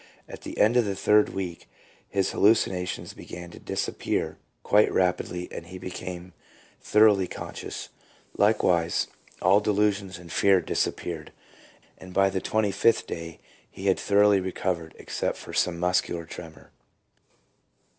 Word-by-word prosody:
At - - -10
the - - -8
end 110 +4 +4
of 120 - +4
the 100 -1 -2
third 105 +2 +4
week 90 -3 -6 0.4
his 95 -1 0
hallucinations 95 -4 +1
began 85 0 -9
to - - -12
disappear - - -2 0.2
quite 105 +1 +4
rapidly, 90 -1 0
and 85 - -7
he 90 +1 -8
became 90 -1 -7 0.5
thoroughly 105 -3 +4
conscious. - - -7 0.5
Likewise 90 -5 +2 0.3
all 95 +2 +6
delusions 100 -2 0
and 85 -1 -12
fear 100 0 +4
disappeared, 80 -3 -3 0.7
and 90 -1 -11
by 95 0 +4
the 95 -1 -2
twenty 110 -2 +1
fifth 115 +3 +3
day 85 -1 -7 0.3
he 95 - -9
had 95 -1 +3
thoroughly 100 0 +4
recovered, 90 -3 -3
except - - -3
for - - -10
some 90 -2 +1
muscular 90 -1 0
tremor. 80 -1 -11
95 Hz, 135 wpm, -26 LUFS, 90-100 Hz, 0.7 s, all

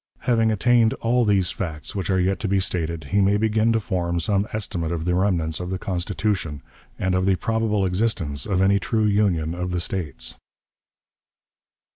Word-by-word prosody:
Having 115 -2 +2
attained 115 +1 +3
all 120 +2 +1
these 100 -4 +2
facts 80 -5 -5
which 95 -1 -3
are 95 -1 +2
yet 95 +2 +1
to 110 - -2
be 100 0 +2
stated, 85 -3 -2
he 100 +1 +3
may 100 +1 +3
begin 110 +1 +2
to 115 - +2
form 85 -4 -1
some 100 +4 0
estimate 95 -7 -3
of 85 -1 -3
the 90 - +1
remnants 90 -4 +1
of 90 0 -4
the 95 - -2
Constitution, 90 -4 -2 0.3
and 95 0 0
of 90 +1 +1
the 95 - +4
probable 110 0 0
existence 90 -5 -1
of 95 -2 +2
any 100 +1 +4
true 110 +1 0
union 95 -6 +1
of 90 +1 -3
the 90 -1 -1
States. 75 -9 -3
95 Hz, 180 wpm, -23 LUFS, 85-105 Hz, 0.3 s, the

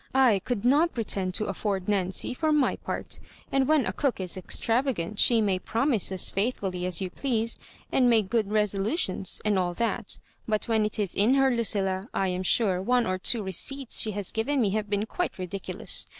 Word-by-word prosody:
/ 210 -7 +3
could 240 -3 -2
not 295 +6 +3
pretend 195 -5 -1
to 215 +3 -1
afford 195 -1 -3
Nancy 195 +2 0
for 310 +4 0
my 295 -3 +2
part; - - -5 0.3
and 270 -1 +2
when 305 -3 +3
a - - -2
cook 275 -7 -1
is 185 -2 0
extravagant 220 0 -1
she 235 -2 +5
may 195 -3 +1
promise 230 0 0
as 190 - +2
faithful 200 -1 -1
ly 180 0 -4
as 180 0 0
you 185 -1 -3
please, 230 -3 0 0.3
and 250 -2 +3
make 220 -4 +3
good 220 -4 0
resolutions, 205 - 0
and 205 -2 +2
all 175 -1 -1
that; 230 -1 -2 0.3
but 215 +1 -1
when 220 -2 +2
it 210 - -1
is 200 -4 -1
in 220 +7 +3
her, 270 -2 +3
Lucilla 195 -3 0
— - - -15
^I 190 -1 0
am 180 - -3
sure 185 -1 +1
one 245 +4 +2
or 185 0 -2
two 220 +3 +1
receipts 245 +8 +1
she 220 - +1
has 200 -2 -3
given 250 +6 -1
me 210 -5 +2
have 210 0 -2
been 205 +1 0
quite 355 +10 -3
ridiculous. 185 +2 -3
210 Hz, 205 wpm, -27 LUFS, 190-245 Hz, 0.3 s, she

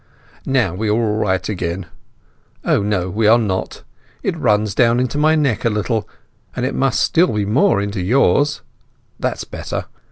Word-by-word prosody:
"Now 130 -10 +1
we 105 +4 -2
are - - +3
all 110 -1 0
right 95 -4 0
again. 90 -2 -3 0.8
Ah—no 100 -3 +1
we 110 +3 +1
are 115 +2 +7
not! 100 -5 -3 0.4
It 190 - -1
runs 105 -8 +1
down 120 +2 +3
into 130 +3 -1
my 155 +1 +4
neck 140 -7 0
a 115 - +3
little, 105 +1 -2 0.5
and 125 - -1
it 130 - -2
must 135 -3 +1
still 170 -10 +2
more 125 - +3
into 100 -1 -3
yours. 135 +8 +2 0.6
That's - - -2
better. - - -5
110 Hz, 160 wpm, -19 LUFS, 100-130 Hz, 0.8 s, are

